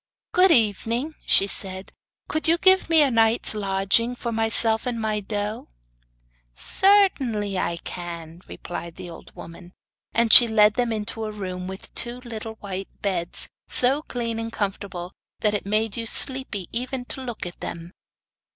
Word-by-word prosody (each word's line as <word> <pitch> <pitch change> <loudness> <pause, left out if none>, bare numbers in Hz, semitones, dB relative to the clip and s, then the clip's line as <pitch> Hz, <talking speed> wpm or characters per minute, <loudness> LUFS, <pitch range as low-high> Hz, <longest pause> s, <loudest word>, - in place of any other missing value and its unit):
'Good 370 +1 +4
evening!' 235 - +1
she 195 - +6
said; 190 -1 -5 0.4
'could 315 - -2
you 335 +1 +4
give 375 0 +3
me 320 -2 +6
a 275 - +2
night's 225 0 +3
lodging 200 +4 0
for 235 -1 -5
myself 225 0 +4
and 240 -2 -3
my 215 -1 -1
doe?' 210 +1 -5 0.9
'Certainly 260 - +1
I 170 -1 -2
can,' 170 -1 -8
replied 170 -1 -8
the 180 -2 -9
old - - -13
woman. 175 +2 -12 0.4
And 230 -1 +2
she 240 - +11
led 215 -1 +4
them 245 0 -1
into 220 +1 -3
a 215 - -5
room 185 -3 -6
with 190 +1 -10
two 240 +1 -2
little 225 -2 -7
white 195 -2 -7
beds, 180 -4 0 0.2
so 265 +4 +3
clean 230 -5 -4
and 225 0 -5
comfortable 195 -4 -5 0.3
that 210 -1 +1
it 205 -1 -3
made 215 +1 -1
you 230 -1 -4
sleepy 260 -9 0
even 250 +1 -4
to 265 - -6
look 240 -7 -6
at 175 - -8
them. 170 +1 -7
220 Hz, 160 wpm, -23 LUFS, 195-240 Hz, 0.9 s, she